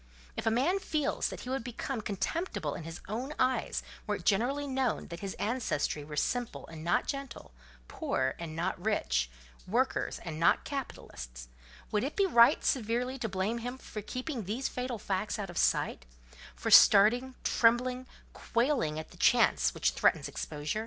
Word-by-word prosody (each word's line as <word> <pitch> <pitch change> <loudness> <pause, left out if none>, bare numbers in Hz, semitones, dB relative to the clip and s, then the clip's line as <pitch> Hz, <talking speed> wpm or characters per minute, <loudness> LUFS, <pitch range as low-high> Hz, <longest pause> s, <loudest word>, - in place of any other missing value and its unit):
If - - -3
a - - +7
man 275 - +2
feels 310 -6 0
that - - -7
he 250 - -7
would 265 -2 -1
become 245 0 -4
contemptible 205 - -2
in 160 - -7
his 165 +1 -7
own 250 +9 -4
eyes 255 0 0 0.2
were - - +1
it - - -9
generally 255 +8 +2
known 265 -4 -1
that 170 0 -7
his 195 0 -5
ancestry 215 - -1
were 150 +1 -8
simple 245 - -1
and 160 -1 -10
not 175 - +2
gentle, 275 - -6 0.4
poor 130 0 -1
and 165 -2 -6
not 175 +2 -2
rich, 60 - +1 0.4
workers - - 0
and 160 -2 -5
not 170 - +4
capitalists, - - -7 0.4
would 210 +1 +1
it 275 - -3
be 395 - +3
right 235 -10 +6
severely 250 +2 0
to 225 - -2
blame 195 +5 -1
him 245 +2 -5
for 215 -4 -7
keeping 255 +1 -4
these 230 +8 -2
fatal 250 -1 -3
facts 200 +2 -2
out 195 -4 -4
of 175 - -9
sight—for - - -2
starting, 245 +6 +7
trembling, 250 +2 +2 0.3
quailing 235 - 0
at 155 - -7
the - - -15
chance - - +4
which - - +2
threatens - - +2
exposure? 150 +6 -4
220 Hz, 165 wpm, -31 LUFS, 165-255 Hz, 0.4 s, a